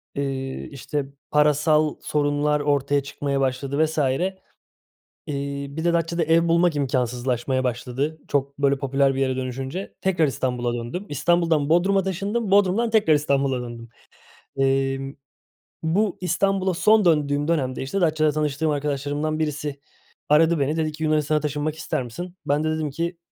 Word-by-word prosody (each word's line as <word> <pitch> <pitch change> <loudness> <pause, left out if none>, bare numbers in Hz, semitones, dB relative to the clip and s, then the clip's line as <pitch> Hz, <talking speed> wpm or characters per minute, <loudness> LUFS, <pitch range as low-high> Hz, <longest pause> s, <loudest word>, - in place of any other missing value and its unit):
Eee, 135 -1 -3
işte, 140 +1 -3 0.3
parasal 150 +1 +3
sorunlar 150 0 +1
ortaya 145 -1 +1
çıkmaya 140 0 -2
başladı 135 +3 0
vs. 160 +1 -6
Eee, 175 +8 -1 1.1
bir 160 +3 -5
de 170 - +3
Datça'da 170 0 0
ev 165 +1 +3
bulmak 170 -1 +3
imkânsızlaşmaya 130 -1 -1
başladı. 125 +5 -2
Çok, 140 -1 -1
böyle, 140 -1 +3
popüler 135 0 +1
bir 135 - -2
yere 130 -1 +1
dönüşünce, 130 +8 -5
tekrar 180 -4 +2
İstanbul'a 125 -3 -1
döndüm. 120 - -5
İstanbul'dan 160 0 +1
Bodrum'a 190 +4 +3
taşındım, 200 +4 -2
Bodrum'dan 205 +4 +3
tekrar 210 -8 +4
İstanbul'a 140 -3 +1
döndüm. 120 -1 -8 0.7
Emm, 135 0 0 0.7
bu 190 +5 +1
İstanbul'a 190 0 +1
son 210 +3 +4
döndüğüm 145 -2 +2
dönemde, 135 -7 0
işte, 165 +9 -2
Datça'da 155 -2 +3
tanıştığım 150 +1 0
arkadaşlarımdan 145 +1 -2
birisi 150 -2 -3 0.5
aradı 160 +2 +4
beni, 145 +3 0
dedi 155 -1 0
ki 155 +1 -6
Yunanistan'a 155 -1 +2
taşınmak 150 +1 -2
ister 155 -3 -2
misin? 175 +10 -7
Ben 145 +2 +1
de 155 - 0
dedim 155 -1 -1
ki 170 +4 -3
150 Hz, 140 wpm, -23 LUFS, 135-165 Hz, 1.1 s, tekrar